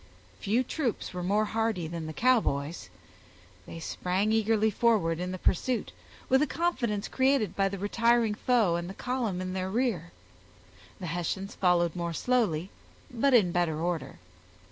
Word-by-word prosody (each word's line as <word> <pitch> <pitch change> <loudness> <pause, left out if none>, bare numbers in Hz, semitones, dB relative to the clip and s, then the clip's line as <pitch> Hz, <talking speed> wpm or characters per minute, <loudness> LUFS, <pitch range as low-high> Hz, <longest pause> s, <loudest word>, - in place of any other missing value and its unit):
Few 230 +6 +1
troops 255 -6 -3
were 180 - -4
more 205 +4 +1
hardy 220 -5 -1
than 165 -1 -5
the - - -4
Cowboys; 165 - +1 0.8
they 165 - -8
sprang 185 +5 -1
eagerly 220 0 +2
forward 205 -7 +2
in 180 +1 -3
the 185 - -4
pursuit, 235 +7 0 0.4
with 265 +1 +4
a 300 - +2
confidence 235 -12 -1
created 260 -7 +1
by 195 0 +2
the 200 - -5
retiring 230 +3 +2
foe 215 -6 +2
and 175 +1 -5
the 195 - -8
column 240 -8 -2
in 185 0 -4
their 185 0 -2
rear; 205 -7 -1 0.9
the 185 - -6
Hessians 175 +4 -3
followed 175 -2 +2
more 170 -1 -3
slowly, 195 -6 0 0.4
but 250 +2 +3
in 195 -7 +4
better 170 -3 0
order. 170 0 -3
200 Hz, 155 wpm, -29 LUFS, 175-235 Hz, 0.9 s, with